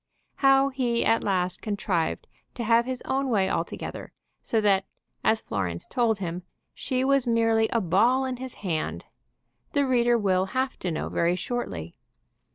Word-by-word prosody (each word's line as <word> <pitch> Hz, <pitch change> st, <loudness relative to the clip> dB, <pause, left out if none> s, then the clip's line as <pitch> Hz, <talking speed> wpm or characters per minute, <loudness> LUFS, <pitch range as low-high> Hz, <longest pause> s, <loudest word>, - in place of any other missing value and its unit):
How 270 Hz, 0 st, +5 dB
he 245 Hz, -3 st, 0 dB
at 225 Hz, -, +3 dB
last 185 Hz, -2 st, 0 dB
contrived 195 Hz, -6 st, -1 dB, 0.3 s
to 240 Hz, -, -3 dB
have 230 Hz, +1 st, +4 dB
his 260 Hz, -1 st, -4 dB
own 270 Hz, 0 st, -1 dB
way 200 Hz, -5 st, +2 dB
altogether, -, -, -4 dB, 0.3 s
so 225 Hz, -, +1 dB
that, 195 Hz, -2 st, +3 dB, 0.4 s
as 220 Hz, 0 st, +2 dB
Florence 90 Hz, -4 st, -3 dB
told 230 Hz, -3 st, +1 dB
him, 180 Hz, -2 st, -4 dB, 0.3 s
she 255 Hz, -1 st, -2 dB
was 275 Hz, -2 st, +2 dB
merely 225 Hz, -1 st, +3 dB
a 230 Hz, -, 0 dB
ball 230 Hz, +9 st, +3 dB
in 255 Hz, -1 st, -3 dB
his 260 Hz, 0 st, -7 dB
hand, 160 Hz, -4 st, -2 dB, 0.7 s
the 285 Hz, -1 st, +2 dB
reader 240 Hz, -2 st, +3 dB
will 190 Hz, -3 st, +2 dB
have 260 Hz, 0 st, -1 dB
to 180 Hz, -, -2 dB
know 160 Hz, -, -3 dB
very 170 Hz, +1 st, +1 dB
shortly. 95 Hz, -, -5 dB
225 Hz, 160 wpm, -26 LUFS, 185-255 Hz, 0.7 s, How